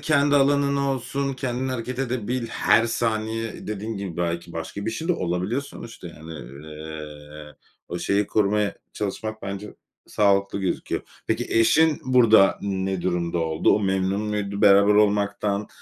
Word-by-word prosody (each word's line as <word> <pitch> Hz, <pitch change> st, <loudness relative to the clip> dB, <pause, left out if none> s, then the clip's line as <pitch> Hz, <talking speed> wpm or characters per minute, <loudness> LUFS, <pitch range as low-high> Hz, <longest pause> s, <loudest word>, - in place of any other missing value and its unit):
kendi 145 Hz, -1 st, +3 dB
alanın 140 Hz, 0 st, +3 dB
olsun, 140 Hz, 0 st, -1 dB
kendin 130 Hz, 0 st, -2 dB
hareket 125 Hz, 0 st, -4 dB
edebil, 125 Hz, -2 st, -2 dB
her 115 Hz, 0 st, +3 dB
saniye 115 Hz, -1 st, -2 dB
dediğin 110 Hz, +1 st, -4 dB
gibi 100 Hz, -4 st, -5 dB
belki 85 Hz, 0 st, -2 dB
başka 85 Hz, +5 st, -5 dB
bir -, -, +1 dB
şey 160 Hz, +9 st, -5 dB
de -, -, +5 dB
olabiliyor 90 Hz, -, -1 dB
sonuçta 115 Hz, -9 st, -10 dB
yani, 80 Hz, 0 st, -11 dB, 0.3 s
eee, 75 Hz, -1 st, -9 dB, 0.3 s
o 85 Hz, -, -4 dB
şeyi 100 Hz, +3 st, +1 dB
korumaya 105 Hz, 0 st, +1 dB, 0.2 s
çalışmak 110 Hz, +2 st, -4 dB
bence 100 Hz, +2 st, -6 dB, 0.3 s
sağlıklı 100 Hz, -1 st, +2 dB
gözüküyor. 95 Hz, -2 st, -2 dB, 0.2 s
Peki -, -, -1 dB
eşin 145 Hz, +8 st, +4 dB
burada 115 Hz, -6 st, +5 dB
ne 95 Hz, -2 st, -2 dB
durumda 85 Hz, -1 st, -1 dB
oldu? 80 Hz, -1 st, +1 dB
O -, -, -1 dB
memnun 95 Hz, 0 st, 0 dB
muydu 105 Hz, -1 st, -3 dB
beraber 100 Hz, 0 st, +6 dB
olmaktan? 105 Hz, 0 st, +1 dB
105 Hz, 140 wpm, -24 LUFS, 95-120 Hz, 0.3 s, beraber